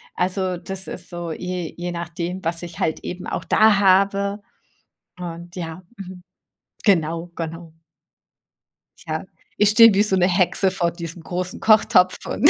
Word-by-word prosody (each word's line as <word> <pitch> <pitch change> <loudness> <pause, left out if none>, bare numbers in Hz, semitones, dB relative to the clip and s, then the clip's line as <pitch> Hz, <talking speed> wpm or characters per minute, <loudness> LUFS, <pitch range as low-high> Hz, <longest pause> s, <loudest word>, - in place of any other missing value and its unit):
Also, 185 0 -1
das 190 +2 -5
ist 180 - -3
so 175 -2 -5
je 180 0 -4
je 175 0 -4
nachdem, 170 +2 -5
was 165 +1 -2
ich 170 -1 -8
halt 160 - 0
eben 180 0 -6
auch - - -4
da 215 -2 +4
habe. 200 +1 +3 0.8
Und, 175 0 -8
ja, 175 0 -6 0.2
mhm, 185 -2 -9 0.6
genau, 170 -3 +1
genau. 165 0 -6 1.4
Ja, - - -3 0.3
ich 210 -1 +4
stehe 230 0 +8
wie 205 +2 +4
so 195 -3 +1
'ne 180 -1 +3
Hexe 185 +1 +2
vor 170 -3 0
diesem 170 0 -8
großen 180 +1 -4
Kochtopf 195 -4 +4
und 295 - +4
180 Hz, 150 wpm, -22 LUFS, 170-195 Hz, 1.4 s, stehe